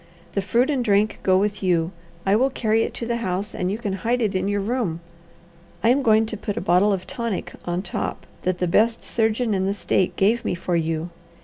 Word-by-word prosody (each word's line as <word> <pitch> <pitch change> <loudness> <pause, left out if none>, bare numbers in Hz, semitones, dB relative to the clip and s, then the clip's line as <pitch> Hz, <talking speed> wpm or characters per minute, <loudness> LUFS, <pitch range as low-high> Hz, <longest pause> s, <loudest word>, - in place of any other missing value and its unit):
The 200 - 0
fruit 235 +8 +2
and 265 -4 0
drink 210 -1 +2
go 185 -1 +4
with 205 +1 0
you. 175 -3 +1 0.3
I 195 +1 +4
will 260 +5 +3
carry 225 -4 +1
it - - -2
to 235 - -4
the 235 0 -1
house, 200 -2 -2
and 180 +1 -1
you 205 - -2
can 210 -4 -3
hide 240 +2 +1
it 215 -4 0
in 185 +1 0
your 205 0 0
room. 200 -5 -1 0.8
I 230 - +5
am 265 +3 +4
going 220 -3 +4
to 220 - -4
put 205 0 -4
a - - +1
bottle 180 +3 +3
of 190 -2 -1
tonic 235 -5 -3
on 175 +1 -2
top 185 - -4 0.2
that 185 -1 0
the 180 - 0
best 225 +6 +2
surgeon 225 0 0
in 190 -1 0
the 200 - 0
state 185 -1 0
gave 225 +5 +2
me - - -1
for 175 0 -2
you. 165 +1 -1
205 Hz, 230 wpm, -23 LUFS, 185-230 Hz, 0.8 s, I